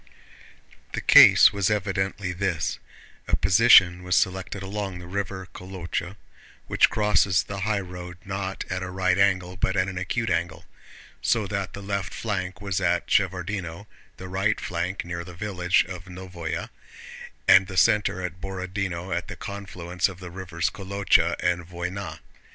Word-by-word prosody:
The - - -2
case - - +8
was 100 -1 +1
evidently 95 -2 -1
this: 90 -3 -2 0.5
a - - +2
position 90 - +6
was 90 0 0
selected 95 +1 0
along 100 -1 -4
the 90 - -9
river 95 0 -4
Kolochá—which 90 0 -3
crosses 105 -4 +2
the 100 0 -6
highroad 90 -3 -3
not 95 -1 -4
at 95 0 -3
a 95 - -4
right 90 0 +1
angle 95 -2 +2
but 95 +1 0
at 95 0 +2
an 95 -1 -4
acute 110 +5 -2
angle—so 85 +6 -3
that 100 -2 -3
the 100 - -8
left 100 -2 -3
flank 95 -3 -3
was 100 -2 -2
at 85 -1 0
Shevárdino, 95 -1 -1 0.3
the 95 - -8
right 95 +3 0
flank 90 +2 -3
near 85 0 -5
the 90 0 -11
village 90 -2 +1
of 90 -2 -8
Nóvoe, 90 -3 -6 0.8
and 95 - +7
the 95 -1 -7
center 105 -3 +3
at 90 0 -6
Borodinó 95 -1 -4
at 85 - -3
the - - -7
confluence 90 -3 -3
of 95 -1 -11
the 90 -2 -9
rivers 90 0 -3
Kolochá 100 -2 +1
and 90 -1 0
Vóyna. 90 +3 -5
95 Hz, 145 wpm, -25 LUFS, 90-100 Hz, 0.8 s, case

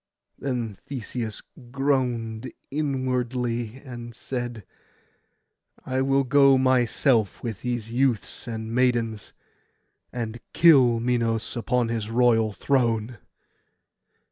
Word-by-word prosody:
Then 120 -6 -3
Theseus 120 -4 -5 0.3
groaned 125 -4 -1 0.2
inwardly, 125 -4 -2
and 120 -2 -8
said, 120 -4 -5 1.2
'I 130 0 0
will 135 +1 +2
go 135 0 +5
myself 125 -3 +2
with 115 -5 -4
these 120 -3 -3
youths 125 -1 0
and 110 -1 -5
maidens, 120 -4 0 0.8
and 115 -1 -4
kill 130 -8 +6
Minos 115 -1 0
upon 120 0 0
his 110 -2 -2
royal 115 -2 +3
throne. 115 -2 0
120 Hz, 90 wpm, -25 LUFS, 115-130 Hz, 1.2 s, kill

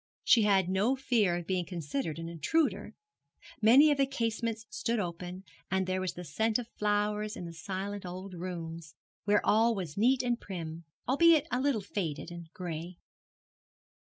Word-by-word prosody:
She 235 - +6
had 195 -4 +3
no 200 +8 +2
fear 230 -9 +2
of 175 - -5
being 185 0 0
considered 160 -3 -4
an 165 0 -5
intruder. 170 - 0 0.7
Many 265 +8 +7
of 285 - +1
the 275 - +4
casements 230 -3 -2
stood 230 +2 -1
open, 180 -1 -4 0.3
and 190 0 +1
there 185 0 -1
was 185 - -2
the 180 - -7
scent 220 +8 0
of 245 -2 -5
flowers 210 0 0
in 175 - -6
the 170 - -7
silent 195 +3 -5
old 185 +1 -7
rooms, 170 -3 -6 0.3
where 205 0 +3
all 225 +2 +4
was 180 -5 -5
neat 250 +4 +3
and 240 -1 0
prim, 165 -3 -6 0.2
albeit 310 +2 +5
a 250 - +1
little 270 -6 +1
faded 175 -5 -4
and 170 -1 -9
gray. 175 -1 -6
195 Hz, 165 wpm, -31 LUFS, 175-230 Hz, 0.7 s, Many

